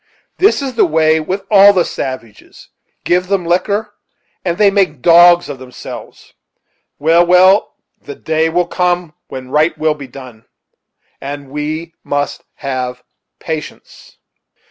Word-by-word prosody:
This 385 -6 +3
is 265 -2 -4
the 230 - +3
way 160 0 +2
with 185 +5 -4
all 200 0 +7
the 180 -3 +2
savages; 130 -5 -8 0.3
give 180 +1 +1
them 195 -2 -1
liquor, 200 +5 -1 0.5
and 175 -2 -2
they 205 -2 +4
make 180 -10 0
dogs 175 +1 +6
of 140 -3 -7
themselves. 125 -1 -11 0.6
Well, 165 +3 +3
well 185 +3 +4 0.3
the 430 - -9
day 160 - -1
will 175 +2 0
come 180 -3 -1
when 130 -1 -9
right 155 +3 +1
will 155 0 +1
be 145 -3 -10
done; 125 -4 -13 0.8
and 140 0 -7
we 155 +3 -4
must 145 0 -3
have 125 -2 -5 0.3
patience." 160 -2 -8
165 Hz, 135 wpm, -15 LUFS, 145-180 Hz, 0.8 s, all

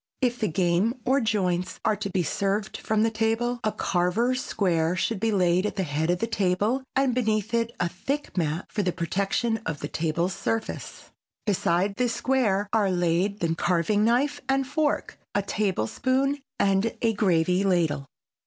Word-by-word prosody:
If 245 -2 0
the 215 - +1
game 180 +6 +1
or 270 +2 +3
joints 185 -5 0
are 215 - +3
to 200 0 -3
be 185 -2 0
served 200 +5 -1
from 215 0 0
the 225 - +2
table, 225 +2 0
a 215 - +1
carver's 225 +10 0
square 170 -4 +1
should 210 +3 -1
be 225 +2 +1
laid 185 0 +2
at - - -5
the 195 - 0
head 155 0 -1
of 175 - +2
the 230 - -1
table 210 +4 0
and 270 -1 +2
beneath 220 -2 0
it 230 0 +1
a 175 - +1
thick 275 +12 -4
mat 165 -1 -1
for 210 - 0
the 185 -2 0
protection 195 +6 0
of 150 -6 -3
the 145 - -4
table 165 +2 -1
surface. 195 +4 -4 0.3
Beside 195 -1 +1
this 245 -2 +1
square 220 -7 +1
are 210 -3 +3
laid 180 +3 0
the 165 -1 +1
carving 175 +5 +1
knife 280 +6 +2
and 270 0 +2
fork, 295 +2 -1 0.2
a 205 - +2
table 195 - 0
spoon 270 - 0 0.2
and 195 +3 +2
a 225 -1 +3
gravy 180 -2 +2
ladle. 165 -7 +1
200 Hz, 175 wpm, -26 LUFS, 180-230 Hz, 0.3 s, or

